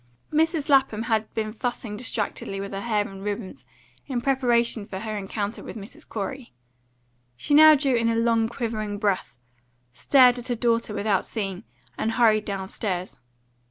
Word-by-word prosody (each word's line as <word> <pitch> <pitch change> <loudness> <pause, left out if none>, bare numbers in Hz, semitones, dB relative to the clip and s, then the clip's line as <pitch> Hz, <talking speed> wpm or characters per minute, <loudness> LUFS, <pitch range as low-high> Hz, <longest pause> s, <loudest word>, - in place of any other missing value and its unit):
Mrs. 320 -1 +1
Lapham 265 -6 +3
had 220 -1 0
been 215 -1 -2
fussing 235 -2 -4
distractedly 210 -3 -3
with 200 0 -5
her 195 - -3
hair 210 -2 0
and 195 0 -10
ribbons, 200 - -5 0.4
in 260 -3 -1
preparation 240 -4 +1
for 195 -1 -7
her 215 -1 -4
encounter 205 +1 -4
with - - -8
Mrs. 200 0 -11
Corey. 230 +4 -5 0.8
She 290 - -1
now 310 +1 +9
drew 275 -2 +1
in 230 -1 +2
a 230 - +1
long 230 -1 +2
quivering 220 -4 -3
breath, 200 -3 -1 0.6
stared 250 - +5
at 245 - -7
her 245 - 0
daughter 230 -2 0
without 205 -2 +1
seeing 195 -4 -4
her, 200 - -13 0.4
and 225 - 0
hurried 220 -3 +3
downstairs. 190 -2 -4
225 Hz, 160 wpm, -25 LUFS, 205-245 Hz, 0.8 s, now